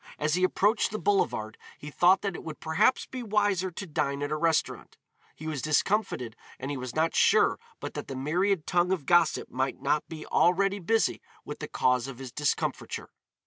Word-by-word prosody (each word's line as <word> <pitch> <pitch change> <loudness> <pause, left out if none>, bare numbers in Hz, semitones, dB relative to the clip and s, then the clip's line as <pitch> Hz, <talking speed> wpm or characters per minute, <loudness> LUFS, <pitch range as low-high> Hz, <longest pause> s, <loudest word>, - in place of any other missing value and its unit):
As 150 0 0
he 180 +2 +1
approached 205 +4 +2
the 215 - -4
boulevard 195 - 0 0.2
he 150 - -9
thought 180 +6 +4
that 200 -2 -1
it - - -8
would 155 -2 -7
perhaps 160 +10 +2
be 255 - -7
wiser 205 -4 +1
to 185 +3 -7
dine 145 -3 -2
at 145 - -3
a - - +1
restaurant; 160 0 -1 0.4
he 155 - -10
was 155 -4 -3
discomfited 155 - 0 0.2
and 135 +2 -5
he - - -2
was 125 -2 -6
not 160 +1 +1
sure - - +4 0.2
but - - -6
that - - -6
the 135 - -6
myriad 170 +6 0
tongue 175 0 +1
of 175 -7 -1
gossip 175 0 +3
might 130 +1 -2
not 150 - 0
be 160 -2 -7
already 195 +3 +2
busy 225 +5 +1 0.2
with - - -7
the - - -5
cause 125 0 +1
of 135 -3 -8
his 130 -2 -8
discomfiture. 150 +1 -2
160 Hz, 195 wpm, -28 LUFS, 145-190 Hz, 0.4 s, thought